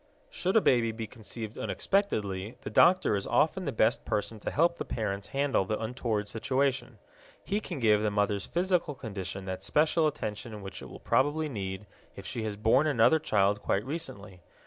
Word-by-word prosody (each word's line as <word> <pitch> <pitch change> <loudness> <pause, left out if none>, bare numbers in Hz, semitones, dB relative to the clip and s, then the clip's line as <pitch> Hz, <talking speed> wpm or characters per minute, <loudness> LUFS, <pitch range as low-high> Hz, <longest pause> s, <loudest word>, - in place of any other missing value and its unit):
Should 225 - +1
a - - +6
baby 120 - +3
be 110 0 -5
conceived 110 0 -7
unexpectedly, 105 - -1
the - - -6
doctor 185 - +5
is 100 - -3
often 180 +4 +2
the 140 - -1
best 115 +2 +2
person 105 +1 -2
to - - -3
help 170 +3 +2
the - - -1
parents 100 -3 -3
handle 140 -6 +1
the 105 +3 -2
untoward 110 -3 -2
situation. 130 +2 -1 0.5
He 205 - -1
can 180 -5 -6
give 105 -4 +3
the 105 - +1
mother's 100 -1 0
physical 175 -4 0
condition 95 -5 -6
that 95 -1 -4
special 155 +1 +2
attention 105 -6 -5
which 95 - -7
it - - -9
will - - -10
probably 150 +3 +1
need 95 -4 -5 0.3
if 100 - -10
she 120 -3 -4
has 105 -1 -3
borne 115 +8 +3
another 145 +3 +4
child 105 -6 +2
quite 100 +3 0
recently. 105 - -6
115 Hz, 180 wpm, -29 LUFS, 105-145 Hz, 0.5 s, a